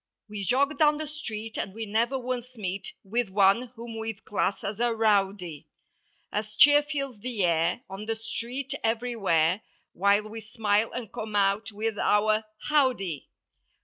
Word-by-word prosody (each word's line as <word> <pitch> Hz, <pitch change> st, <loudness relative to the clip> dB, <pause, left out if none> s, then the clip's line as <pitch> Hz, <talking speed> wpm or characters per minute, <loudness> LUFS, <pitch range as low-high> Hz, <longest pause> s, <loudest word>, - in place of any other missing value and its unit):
We 210 Hz, -1 st, -5 dB
jog 275 Hz, +5 st, +2 dB
down 300 Hz, -1 st, +5 dB
the 310 Hz, -, -3 dB
street 225 Hz, -8 st, -6 dB
and 195 Hz, -, -4 dB
we 225 Hz, 0 st, -4 dB
never 230 Hz, +5 st, +1 dB
once 250 Hz, -1 st, -4 dB
meet 195 Hz, -1 st, -4 dB
With 225 Hz, +2 st, -1 dB
one 200 Hz, +5 st, +4 dB
whom 230 Hz, -1 st, -7 dB
we'd 220 Hz, -2 st, -5 dB
class 200 Hz, -1 st, -1 dB
as 200 Hz, +1 st, -4 dB
a 240 Hz, -1 st, +2 dB
rowdy. 195 Hz, -7 st, +1 dB, 0.6 s
As 215 Hz, 0 st, -3 dB
cheer 290 Hz, +5 st, +8 dB
fills 275 Hz, -6 st, -4 dB
the 230 Hz, -3 st, -2 dB
air, 165 Hz, +6 st, +1 dB
on 195 Hz, +3 st, -7 dB
the 225 Hz, -, 0 dB
street—everjrwhere— 225 Hz, -, -1 dB, 0.3 s
While 200 Hz, +3 st, +3 dB
we 225 Hz, +1 st, -7 dB
smile 215 Hz, 0 st, +1 dB
and 235 Hz, -4 st, -6 dB
come 215 Hz, -1 st, -5 dB
out 200 Hz, +2 st, +2 dB
with 215 Hz, 0 st, -3 dB
our 215 Hz, +1 st, +3 dB, 0.2 s
"Howdy." 255 Hz, -, +1 dB
220 Hz, 150 wpm, -27 LUFS, 200-245 Hz, 0.6 s, cheer